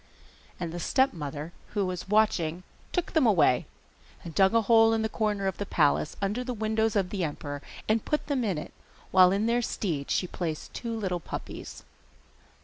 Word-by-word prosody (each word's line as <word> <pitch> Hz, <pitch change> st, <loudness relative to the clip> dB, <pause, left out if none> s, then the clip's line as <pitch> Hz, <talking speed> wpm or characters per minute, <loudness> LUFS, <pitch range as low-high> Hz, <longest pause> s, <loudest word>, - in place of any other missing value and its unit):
And 170 Hz, -2 st, -3 dB
the 175 Hz, -, -5 dB
stepmother, 165 Hz, -, -1 dB, 0.2 s
who 200 Hz, -2 st, +2 dB
was 185 Hz, 0 st, -4 dB
watching, 185 Hz, -6 st, +2 dB, 0.3 s
took 355 Hz, -2 st, -1 dB
them 310 Hz, -7 st, +4 dB
away, 170 Hz, -, +4 dB, 0.6 s
and 165 Hz, -, -8 dB
dug 190 Hz, +4 st, +4 dB
a 230 Hz, -, +4 dB
hole 225 Hz, 0 st, +5 dB
in 225 Hz, 0 st, +1 dB
the -, -, +1 dB
corner 210 Hz, -3 st, -1 dB
of 190 Hz, -2 st, -2 dB
the 205 Hz, -, -2 dB
palace, 150 Hz, -1 st, +2 dB
under 210 Hz, +6 st, -1 dB
the 250 Hz, -1 st, -4 dB
windows 220 Hz, 0 st, 0 dB
of 190 Hz, -3 st, +1 dB
the 195 Hz, -3 st, -1 dB
emperor, 145 Hz, -2 st, -4 dB, 0.3 s
and 215 Hz, 0 st, +2 dB
put 300 Hz, -, -1 dB
them 275 Hz, -4 st, 0 dB
in 195 Hz, -7 st, 0 dB
it, 150 Hz, -, -7 dB, 0.4 s
while 185 Hz, -1 st, +7 dB
in 200 Hz, +3 st, +1 dB
their 235 Hz, +1 st, +2 dB
stead 165 Hz, -11 st, -2 dB
she -, -, +1 dB
placed 165 Hz, -3 st, -5 dB
two 230 Hz, -1 st, -4 dB
little 185 Hz, -5 st, -2 dB
puppies. -, -, -7 dB
200 Hz, 185 wpm, -28 LUFS, 170-225 Hz, 0.6 s, while